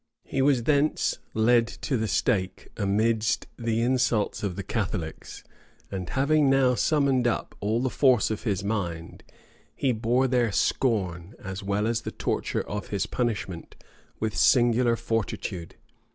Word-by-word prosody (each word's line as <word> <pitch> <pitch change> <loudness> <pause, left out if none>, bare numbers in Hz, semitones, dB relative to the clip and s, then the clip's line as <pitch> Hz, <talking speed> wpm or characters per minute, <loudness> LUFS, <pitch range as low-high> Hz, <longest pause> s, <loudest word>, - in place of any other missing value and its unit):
He 135 - -2
was 135 -3 +3
thence 150 +3 +1 0.2
led 115 +1 +4
to 135 +3 -3
the 110 -2 0
stake 95 -4 -1
amidst 110 +2 +1
the 115 -1 0
insults 120 -3 +1
of 100 -4 -2
the 100 - -5
Catholics; 95 -5 -4 0.5
and 95 -2 -4
having 140 +1 +3
now 135 -2 +4
summoned 135 -3 +2
up 120 - -2
all 110 +4 0
the 130 - 0
force 125 -6 +3
of 110 - -3
his 100 -4 -1
mind, 90 -6 -4 0.5
he 135 - +1
bore 120 +3 +1
their 120 -3 +1
scorn, 95 -5 0
as 95 0 -6
well 100 +1 -1
as 115 0 0
the - - -5
torture - - -2
of 105 -2 -4
his 100 0 -1
punishment, 105 -8 -3 0.4
with 110 -1 -2
singular 120 -1 +4
fortitude. 110 -6 -3
115 Hz, 145 wpm, -26 LUFS, 100-125 Hz, 0.5 s, led